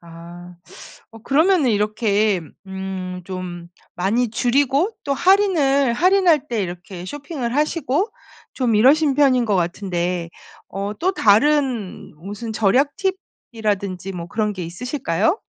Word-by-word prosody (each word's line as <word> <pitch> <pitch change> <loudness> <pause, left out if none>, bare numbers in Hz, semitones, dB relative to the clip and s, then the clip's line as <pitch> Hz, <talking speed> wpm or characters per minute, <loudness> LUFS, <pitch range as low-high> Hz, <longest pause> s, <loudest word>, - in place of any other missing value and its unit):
아 170 +1 -12 0.6
어 225 - -11
그러면은 310 - +3
이렇게 210 -1 +1 0.3
음 190 0 -5 0.3
좀 180 -2 -7 0.3
많이 220 +6 0
줄이고 275 - +1
또 280 - -1
할인을 295 -8 +3
할인할 350 0 +3
때 225 -4 -1
이렇게 175 0 -7
쇼핑을 280 - -5
하시고 305 - 0 0.5
좀 245 -4 0
이러신 280 +6 +4
편인 260 -3 +3
것 210 -3 +1
같은데 175 -1 -2 0.4
어 200 +2 -4
또 375 +3 +1
다른 250 - +1
무슨 205 +7 -7
절약 250 +7 +2 0.6
팁이라든지 200 -4 -3
뭐 170 -2 -6
그런 210 +2 -1
게 185 -3 -6
있으실까요? 220 - -1
225 Hz, 250 characters per minute, -21 LUFS, 190-280 Hz, 0.6 s, 이러신